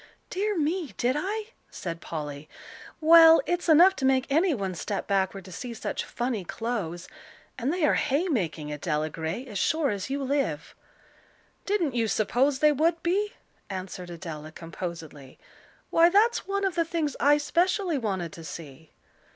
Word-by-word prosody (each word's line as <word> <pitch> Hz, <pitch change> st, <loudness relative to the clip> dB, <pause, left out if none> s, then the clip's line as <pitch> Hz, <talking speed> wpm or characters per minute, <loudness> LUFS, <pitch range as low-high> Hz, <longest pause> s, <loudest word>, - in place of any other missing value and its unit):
"Dear 410 Hz, +1 st, -1 dB
me, 320 Hz, +1 st, -1 dB
did 250 Hz, +2 st, +1 dB
I?" 420 Hz, +7 st, -3 dB, 0.2 s
said 165 Hz, -1 st, -6 dB
Polly. 150 Hz, -2 st, -6 dB, 0.5 s
"Well, 325 Hz, 0 st, +8 dB
it's 350 Hz, 0 st, -1 dB
enough 350 Hz, +5 st, +7 dB
to -, -, -5 dB
make 265 Hz, -1 st, +3 dB
any 335 Hz, +6 st, +3 dB
one 195 Hz, -9 st, -2 dB
step 195 Hz, +3 st, -4 dB
backward 195 Hz, -1 st, -1 dB
to 185 Hz, -, -11 dB
see 235 Hz, +6 st, -6 dB
such -, -, -3 dB
funny 240 Hz, -4 st, -3 dB
clothes; 180 Hz, -5 st, -4 dB, 0.5 s
and 260 Hz, +3 st, -1 dB
they 345 Hz, -2 st, +1 dB
are -, -, +3 dB
hay 300 Hz, +5 st, +1 dB
making, 160 Hz, -, -2 dB
Adela 150 Hz, +1 st, -2 dB
Gray, 165 Hz, -, -4 dB
as 210 Hz, -6 st, -5 dB
sure 315 Hz, -4 st, +1 dB
as 200 Hz, +3 st, -4 dB
you 275 Hz, +1 st, -2 dB
live." 265 Hz, -, -1 dB, 0.9 s
"Didn't 370 Hz, -, +1 dB
you 230 Hz, -2 st, +1 dB
suppose 255 Hz, +6 st, +1 dB
they 300 Hz, +2 st, +4 dB
would 325 Hz, +3 st, +1 dB
be?" 405 Hz, +4 st, 0 dB, 0.4 s
answered 185 Hz, -2 st, -6 dB
Adela, 160 Hz, -3 st, -7 dB
composedly. 165 Hz, -5 st, -8 dB, 0.5 s
"Why, 335 Hz, +1 st, +6 dB
that's 425 Hz, +6 st, +3 dB
one 400 Hz, 0 st, -1 dB
of 380 Hz, -, 0 dB
the 335 Hz, 0 st, +1 dB
things 325 Hz, -3 st, -2 dB
I 290 Hz, +1 st, +5 dB
specially 345 Hz, +2 st, +1 dB
wanted 190 Hz, -8 st, -3 dB
to 165 Hz, -, -10 dB
see." 160 Hz, -1 st, -10 dB
255 Hz, 160 wpm, -27 LUFS, -, 0.9 s, Well